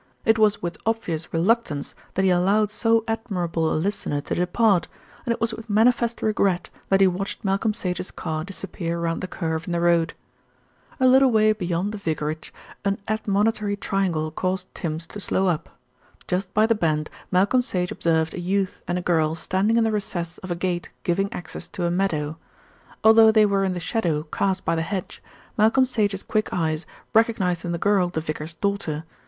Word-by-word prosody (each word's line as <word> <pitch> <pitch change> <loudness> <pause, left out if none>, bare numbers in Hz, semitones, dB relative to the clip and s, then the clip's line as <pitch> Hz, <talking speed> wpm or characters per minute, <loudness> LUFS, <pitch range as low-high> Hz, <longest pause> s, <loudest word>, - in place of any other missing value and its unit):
It 220 0 +4
was 210 -3 +3
with 170 -1 -4
obvious 180 -8 -2
reluctance 170 -4 0 0.2
that 190 - +2
he 185 - +4
allowed 200 +4 +3
so 225 +1 +2
admirable 180 -8 -1
a - - +1
listener 165 -4 -1
to - - -4
depart, 180 0 +2 0.4
and - - +2
it 235 - -1
was 230 0 0
with 225 +1 -9
manifest 235 +2 +2
regret 195 -4 +1 0.2
that 195 0 +4
he - - +8
watched 190 +3 -2
Malcolm 200 +3 +1
Sage's 180 -4 -3
car 155 -2 -4
disappear 175 -2 -4
round 165 0 -1
the 185 - -3
curve 160 -3 -3
in 175 - -2
the 170 - +1
road. 170 -1 +2 0.8
A 260 - +3
little 260 +1 +6
way 215 -2 +4
beyond 180 0 -2
the 210 - -6
vicarage, 155 -3 -3 0.3
an 200 0 0
admonitory 210 -1 0
triangle 180 -6 -1
caused 185 +3 -3
Tims 165 -1 -4
to 205 - -9
slow 195 -1 0
up. 175 -5 0 0.6
Just 185 +1 -1
by 215 +2 +4
the 230 - +3
bend 155 -7 0 0.2
Malcolm 200 +7 +3
Sage 180 -7 -2
observed 160 -1 +1
a - - -5
youth 190 +2 -1
and 175 - 0
a 180 - -3
girl 160 -3 +2
standing 195 +7 +1
in 230 - +4
the 225 - +1
recess 175 -5 -3
of 185 - -9
a 175 - -1
gate 175 -2 -2
giving 195 +3 0
access 175 - -7
to 180 -4 -4
a 170 - +1
meadow. 160 -5 -1 0.7
Although 220 0 +8
they 215 -1 +5
were 200 -1 +2
in 190 -1 0
the - - -3
shadow 170 -6 -1
cast 190 -1 0
by - - +2
the 165 - 0
hedge, 185 +3 -4 0.4
Malcolm 225 +5 +5
Sage's 205 -6 -1
quick 215 -1 -1
eyes 160 -2 -1 0.3
recognised 200 -6 +2
in 175 - -2
the 170 - -1
girl 195 -1 +2
the 170 - -2
vicar's 155 +1 -5
daughter. 200 -7 -2
185 Hz, 190 wpm, -24 LUFS, 170-215 Hz, 0.8 s, he